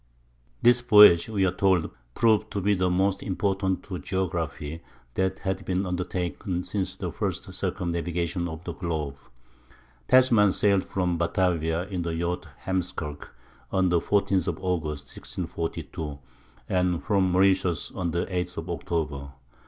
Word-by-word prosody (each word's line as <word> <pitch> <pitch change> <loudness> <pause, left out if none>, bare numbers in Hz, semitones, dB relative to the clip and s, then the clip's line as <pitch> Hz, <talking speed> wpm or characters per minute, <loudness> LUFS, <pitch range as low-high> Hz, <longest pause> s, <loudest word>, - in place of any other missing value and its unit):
"This 120 0 +6
voyage," 105 -6 +8
we 100 -3 +1
are 90 - +2
told, 95 -3 +2 0.2
"proved 110 -2 +3
to 100 - -1
be 100 +2 +2
the 90 -1 +1
most 95 +2 +1
important 95 0 -1
to 90 -3 -6
geography 85 -4 -3 0.3
that 95 +3 0
had 95 -1 -3
been 95 +1 -1
undertaken 90 0 -2
since 95 -1 -3
the - - -4
first - - -2
circumnavigation 85 0 -2
of 80 +1 -7
the 85 - -5
globe." 80 -5 -3 0.9
Tasman 120 -6 +5
sailed 100 -2 +2
from 90 -3 -1
Batavia 85 -1 +1
in 95 -3 -3
the 85 -1 -2
yacht 85 +1 -2 0.2
Heemskirk, 85 -6 -3 0.4
on 95 -1 +2
the 85 -1 +3
14th 100 -1 +1
of 85 -3 -1
August, 80 -6 -2
1642, 80 -2 -5 0.5
and 90 -2 +1
from 95 -3 +2
Mauritius 95 -2 +2
on 90 -2 -2
the 85 +1 -1
8th 90 -2 -3
of 85 +2 -4
October. 75 -5 -3
90 Hz, 140 wpm, -26 LUFS, 85-95 Hz, 0.9 s, voyage